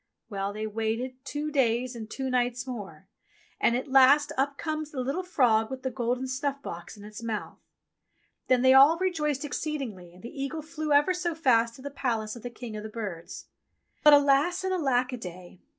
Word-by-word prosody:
Well, 195 Hz, 0 st, -2 dB
they 215 Hz, +1 st, -4 dB
waited 225 Hz, +4 st, -3 dB
two 295 Hz, +2 st, -4 dB
days 250 Hz, -2 st, +1 dB
and 220 Hz, -2 st, -7 dB
two 265 Hz, +2 st, -4 dB
nights 245 Hz, 0 st, 0 dB
more, 195 Hz, -9 st, -8 dB, 0.5 s
and 235 Hz, -, +3 dB
at 255 Hz, -, -2 dB
last 270 Hz, +2 st, +5 dB
up 275 Hz, +1 st, 0 dB
comes 310 Hz, -1 st, -3 dB
the 285 Hz, -, -6 dB
little 275 Hz, +8 st, -1 dB
frog 240 Hz, -11 st, +2 dB
with 260 Hz, -1 st, -7 dB
the 260 Hz, -, -2 dB
golden 245 Hz, +1 st, -1 dB
snuff 275 Hz, +2 st, -2 dB
box 175 Hz, +5 st, -8 dB
in 205 Hz, -, -11 dB
its 210 Hz, +1 st, -9 dB
mouth. 225 Hz, -3 st, -5 dB, 0.9 s
Then 255 Hz, -1 st, +3 dB
they 260 Hz, 0 st, +7 dB
all 280 Hz, +5 st, +7 dB
rejoiced 300 Hz, -6 st, -1 dB
exceedingly, 250 Hz, -, -4 dB
and 180 Hz, +1 st, -17 dB
the 255 Hz, +4 st, -7 dB
eagle 305 Hz, +3 st, -4 dB
flew 310 Hz, 0 st, -4 dB
ever 290 Hz, +5 st, +4 dB
so 355 Hz, -2 st, -2 dB
fast 235 Hz, -7 st, +2 dB
to 260 Hz, -, -13 dB
the 285 Hz, -, -5 dB
palace 225 Hz, -5 st, -2 dB
of 235 Hz, -, -10 dB
the 245 Hz, -, -5 dB
King 235 Hz, -1 st, -8 dB
of 210 Hz, -, -5 dB
the 215 Hz, -, -7 dB
Birds. 205 Hz, -7 st, -7 dB, 0.6 s
But 300 Hz, -, +8 dB
alas 285 Hz, +6 st, +4 dB
and 375 Hz, 0 st, 0 dB
alack 260 Hz, -7 st, +1 dB
a -, -, -3 dB
day 180 Hz, -3 st, -10 dB
255 Hz, 200 wpm, -28 LUFS, 225-290 Hz, 0.9 s, But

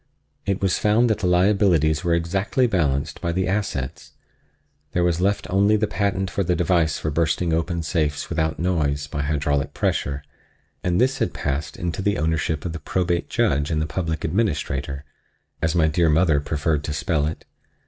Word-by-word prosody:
It 100 Hz, 0 st, -1 dB
was 95 Hz, -2 st, +2 dB
found 110 Hz, +3 st, +3 dB
that 110 Hz, -, 0 dB
the 90 Hz, -, 0 dB
liabilities 90 Hz, -4 st, +3 dB
were 85 Hz, -1 st, +2 dB
exactly 95 Hz, -, +1 dB
balanced 75 Hz, -, 0 dB
by 85 Hz, -, -1 dB
the 95 Hz, +2 st, 0 dB
assets; 95 Hz, -10 st, -3 dB, 0.8 s
there 90 Hz, -, +2 dB
was 85 Hz, 0 st, +1 dB
left 100 Hz, +1 st, +1 dB
only 100 Hz, +3 st, +4 dB
the 110 Hz, -, +1 dB
patent 100 Hz, -2 st, -1 dB
for 100 Hz, -, 0 dB
the 90 Hz, 0 st, +1 dB
device 85 Hz, -3 st, +2 dB
for 80 Hz, -, -3 dB
bursting 80 Hz, +2 st, +1 dB
open 85 Hz, +1 st, -1 dB
safes 75 Hz, -2 st, -1 dB
without 80 Hz, -2 st, -1 dB
noise, 75 Hz, -5 st, 0 dB
by 75 Hz, 0 st, -4 dB
hydraulic 70 Hz, -1 st, -1 dB
pressure 70 Hz, 0 st, -1 dB, 0.6 s
and 90 Hz, 0 st, +1 dB
this 130 Hz, +2 st, +2 dB
had -, -, -1 dB
passed 75 Hz, +1 st, -3 dB
into 85 Hz, +2 st, -3 dB
the 100 Hz, +1 st, +1 dB
ownership 80 Hz, -1 st, -1 dB
of 85 Hz, -, -3 dB
the 80 Hz, -, -5 dB
Probate 90 Hz, -1 st, -1 dB
Judge 75 Hz, +1 st, +1 dB
and 80 Hz, -2 st, 0 dB
the 80 Hz, -, 0 dB
Public 80 Hz, 0 st, -3 dB
Administrator—as 75 Hz, -3 st, -3 dB
my 80 Hz, -2 st, +4 dB
dear 80 Hz, +1 st, +2 dB
mother 80 Hz, -1 st, +3 dB
preferred 75 Hz, +1 st, -1 dB
to 75 Hz, -, -3 dB
spell 80 Hz, -1 st, 0 dB
it. 80 Hz, -, -6 dB
85 Hz, 175 wpm, -23 LUFS, 75-95 Hz, 0.8 s, only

